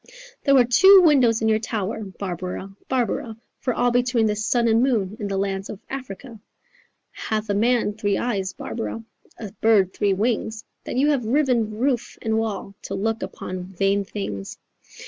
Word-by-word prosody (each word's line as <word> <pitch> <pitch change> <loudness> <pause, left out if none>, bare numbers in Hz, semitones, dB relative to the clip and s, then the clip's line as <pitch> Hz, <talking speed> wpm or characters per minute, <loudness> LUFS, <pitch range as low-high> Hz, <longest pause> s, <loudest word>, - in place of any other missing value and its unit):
"There 275 - +4
were 250 -2 +6
two 380 +10 +7
windows 245 -8 +4
in - - +2
your 220 0 +3
tower, 220 -1 -3
Barbara, 190 0 -6
Barbara, 235 -3 -1 0.2
For 255 - -1
all 245 0 +1
between 245 -1 +2
the 210 -1 +1
sun 235 +3 +1
and 225 +1 +4
moon 220 -7 +1
In 205 - -3
the 195 -1 -2
lands 195 0 -2
of 200 - -7
Africa. 250 -3 -7 0.7
Hath 215 -1 -3
a - - +1
man 230 +1 +2
three 205 -2 -1
eyes, 195 -6 -2
Barbara, 225 +3 -5 0.3
A 215 -4 -7
bird 205 -4 +4
three 200 -2 +1
wings, 220 +1 -1 0.2
That - - -4
you 290 +3 +3
have 250 -6 -1
riven 240 -5 +1
roof 250 -1 -1
and 220 0 +1
wall 205 -3 -4
To 195 - -5
look 220 +3 -1
upon 185 0 -6
vain 195 +2 0
things?" 105 - -6
220 Hz, 170 wpm, -23 LUFS, 195-245 Hz, 0.7 s, two